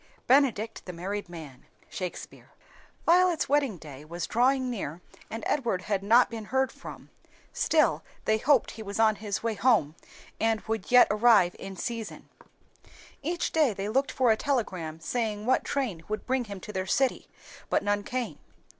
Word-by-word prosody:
"Benedict 250 -5 +2
the 180 - -7
married 195 +3 -4
man." 150 -7 -11 0.2
Shakspeare. 185 -2 -7 0.6
Violet's 355 -1 +4
wedding 280 -7 +1
day 145 -3 -11
was 170 +3 -5
drawing 260 +3 +2
near 185 - -4 0.3
and 225 0 -6
Edward 230 -10 0
had 200 -1 -1
not 230 +5 +5
been 225 -2 -7
heard 265 +3 0
from, - - -11 0.4
still - - +2 0.2
they 220 0 +2
hoped 275 0 +3
he 220 - -9
was 200 0 -5
on 215 -2 +4
his 205 -1 -4
way 230 -1 0
home 215 - +2 0.5
and 225 -1 +2
would 220 -3 -4
yet 250 0 +8
arrive 210 -4 +4
in 195 0 -7
season. 230 +2 -5 0.9
Each 345 +4 -2
day 300 -9 +2
they 195 +2 -3
looked 270 +5 +1
for 255 -4 +3
a - - +4
telegram 185 - -2
saying 215 +3 -2
what 260 +2 +2
train 230 - -2
would 215 0 -3
bring 260 -1 0
him 200 -3 -7
to 210 - -8
their 190 0 -2
city, 265 +4 +1 0.4
but - - +1
none 205 0 +1
came. 245 +3 -4
220 Hz, 165 wpm, -28 LUFS, 195-255 Hz, 0.9 s, yet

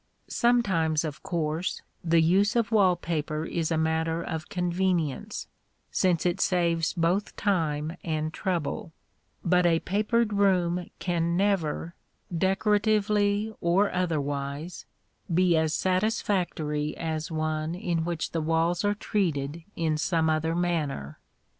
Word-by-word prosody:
Sometimes, 190 - +2
of 150 -1 -5
course, 170 -2 -2 0.2
the 165 -1 +4
use 195 +7 +3
of 230 -1 +1
wall 195 -5 +5
paper 155 -2 -3
is 165 -2 -1
a 165 - +1
matter 160 +1 0
of 160 -2 -5
convenience, 175 -4 -1 0.4
since 180 -3 +1
it 175 -1 +1
saves 170 -2 +2
both 175 +4 0
time 160 -5 0
and 155 -1 -2
trouble; 170 -3 -2 0.5
but 180 0 +4
a 165 -1 +4
papered 215 +3 +1
room 180 -3 +2
can 170 -1 0
never, 175 -4 0 0.4
decoratively 205 +2 +2
or 185 +4 +3
otherwise, 145 -2 -2 0.4
be 175 0 +4
as 160 -1 +2
satisfactory 185 -6 0
as 160 0 -3
one 155 0 -2
in 175 -4 -1
which 170 -1 -3
the 165 - -1
walls 165 +3 +1
are 205 0 +2
treated 165 -7 -1
in 155 -2 0
some 160 -1 +2
other 160 +1 0
manner. 155 - -2
170 Hz, 120 wpm, -27 LUFS, 160-190 Hz, 0.5 s, wall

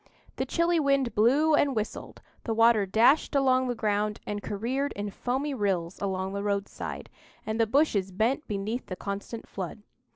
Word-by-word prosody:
The - - -2
chilly 335 0 +2
wind 275 -5 +2
blew 275 +9 +4
and 285 -3 +3
whistled, 215 -1 -5 0.2
the 225 - -2
water 225 -3 +4
dashed 240 +10 +3
along 260 -2 +3
the 245 - -1
ground 210 -1 0
and 205 0 -4
careered 245 +9 -2
in 205 0 -4
foamy 265 +7 -2
rills 190 -7 -1
along 190 -1 -2
the 200 - -2
roadside, 200 -1 -3 0.4
and 220 +1 -2
the 225 - +3
bushes 220 -7 +2
bent 230 +10 0
beneath 210 +4 -3
the 185 - -4
constant 200 +4 -6
flood. 195 +2 -6
220 Hz, 165 wpm, -28 LUFS, 200-265 Hz, 0.4 s, blew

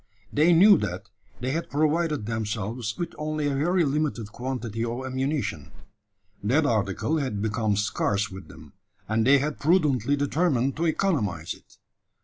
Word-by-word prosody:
They 155 +4 +4
knew 195 +4 +7
that - - -5 0.3
they 130 +1 -1
had 165 +4 -3
provided 155 -3 +1
themselves 110 0 -3
with 170 - -4
only 155 0 -2
a 145 - +1
very 170 +5 +2
limited 140 -7 -1
quantity 120 -3 -4
of 120 +3 -3
ammunition. 130 +2 -2 0.7
That 140 +9 +2
article 110 - 0
had 130 -8 -2
become 110 0 0
scarce 105 0 0
with 95 -3 -9
them; 75 -3 -14 0.3
and 110 +2 +1
they 140 +1 +7
had 145 +2 -2
prudently 145 - +2
determined 145 -2 +1
to 170 +2 +1
economise 110 - 0
it. - - -20
130 Hz, 145 wpm, -26 LUFS, 110-155 Hz, 0.7 s, knew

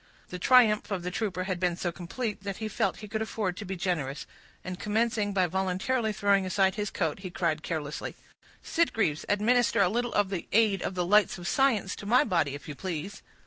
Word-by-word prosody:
The 180 - -6
triumph 220 -1 +5
of 190 -4 -2
the 180 - -3
trooper 185 -3 -2
had 185 -2 -3
been 180 -1 +1
so 175 0 -2
complete, 205 +6 -4
that 200 -1 -5
he 220 - -3
felt 215 -3 -1
he - - -10
could 220 +1 -3
afford 210 -4 -2
to 210 - -6
be 190 0 -4
generous, 165 -7 -2 0.4
and 180 -1 -6
commencing 215 -1 0
by 190 -2 +2
voluntarily 190 +6 0
throwing 200 -2 +2
aside 190 +1 +2
his 210 -1 -2
coat, 160 -1 -2
he 190 -1 -6
cried 165 -3 -1
carelessly,— 155 -3 -4 0.5
"Sitgreaves, 225 - 0
administer 230 +3 +3
a 195 -3 +5
little 240 +3 -1
of 205 -2 +2
the 185 -4 -4
aid 210 -4 +4
of 185 - -3
the 180 -1 0
lights 210 +3 +4
of 175 -1 -6
science 230 -8 +2
to 200 - -8
my 245 +4 +5
body, 170 - 0
if 145 - -10
you 150 - -5
please." 180 +4 -5
195 Hz, 210 wpm, -28 LUFS, 180-215 Hz, 0.5 s, triumph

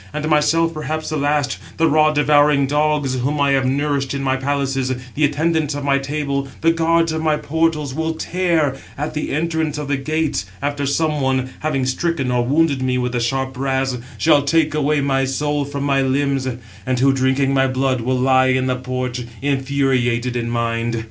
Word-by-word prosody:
And 150 0 -3
myself 165 +2 +2
perhaps 155 0 -4
the 155 - -2
last—the 145 +2 -1
raw 155 0 +4
devouring 145 -1 +3
dogs, 145 -2 0
whom 145 +4 -1
I 140 -1 +3
have 135 -1 +2
nourished 140 0 -1
in 135 - -3
my 130 -1 +1
palaces, 135 -1 -1 0.2
the 155 - -1
attendants 155 0 +1
of 145 - -4
my 140 -1 +2
table, 140 -1 -2
the 165 - +4
guards 165 0 +2
of 160 0 -2
my 155 -1 +1
portals, 155 -3 -1
will 160 +2 -2
tear 165 -5 0 0.2
at 150 +2 -3
the 150 - -3
entrance 160 -1 -1
of 150 -1 -4
the 140 -1 0
gates, 150 - -1 0.2
699 145 +1 0
after 145 0 -4
some 150 +1 0
one, 130 -1 0
having 140 -4 -1
stricken 135 0 -1
or 125 -1 +1
wounded 140 +1 +1
me 130 -1 0
with 125 -1 -1
the 120 - -1
sharp 130 +3 -1
brass, 135 0 -1 0.2
shall 155 -2 +4
take 155 +1 +1
away 150 0 +1
my 135 -1 +1
soul 145 +2 -1
from 140 0 -4
my 140 -1 +2
limbs; 135 0 0 0.4
and 130 +3 -1
who, 135 +1 +4
drinking 135 +1 +1
my 135 0 +3
blood, 130 -1 0
will 130 +2 0
lie 130 0 +3
in 130 0 +1
the 130 -1 0
porch, 125 0 -4 0.2
infuriated 130 -3 0
in 120 -1 -2
mind. 115 0 -1
140 Hz, 190 wpm, -19 LUFS, 130-150 Hz, 0.4 s, raw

